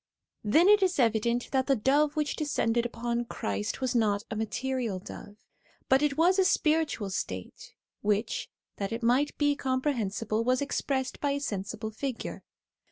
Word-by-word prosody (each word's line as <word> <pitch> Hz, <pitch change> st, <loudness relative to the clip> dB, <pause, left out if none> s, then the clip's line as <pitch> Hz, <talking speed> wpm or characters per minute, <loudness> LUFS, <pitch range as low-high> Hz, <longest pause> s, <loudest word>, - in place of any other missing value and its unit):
Then 310 Hz, -, +4 dB
it 415 Hz, 0 st, +6 dB
is 375 Hz, -1 st, +2 dB
evident 235 Hz, 0 st, +1 dB
that 265 Hz, -1 st, +1 dB
the 275 Hz, -, +4 dB
dove 285 Hz, +6 st, +2 dB
which 300 Hz, -2 st, -1 dB
descended 240 Hz, -6 st, 0 dB
upon 235 Hz, 0 st, -2 dB
Christ 105 Hz, -, -3 dB
was 260 Hz, -1 st, 0 dB
not 210 Hz, -4 st, +2 dB
a -, -, -2 dB
material 235 Hz, 0 st, -2 dB
dove, 205 Hz, +2 st, -10 dB, 0.5 s
but 265 Hz, +1 st, +5 dB
it 295 Hz, -2 st, +1 dB
was 360 Hz, +4 st, +4 dB
a -, -, +6 dB
spiritual 310 Hz, -, +1 dB
state, 95 Hz, -, -5 dB, 0.3 s
which, 210 Hz, +2 st, -1 dB, 0.3 s
that 200 Hz, +1 st, -3 dB
it 230 Hz, +1 st, -4 dB
might 255 Hz, +5 st, +2 dB
be 290 Hz, -1 st, +2 dB
comprehensible, 230 Hz, -6 st, -1 dB
was 255 Hz, +1 st, +2 dB
expressed 270 Hz, -2 st, -2 dB
by 285 Hz, -1 st, 0 dB
a 285 Hz, -, -1 dB
sensible 215 Hz, -3 st, -4 dB
figure. 255 Hz, +2 st, -5 dB
250 Hz, 160 wpm, -29 LUFS, 220-285 Hz, 0.5 s, it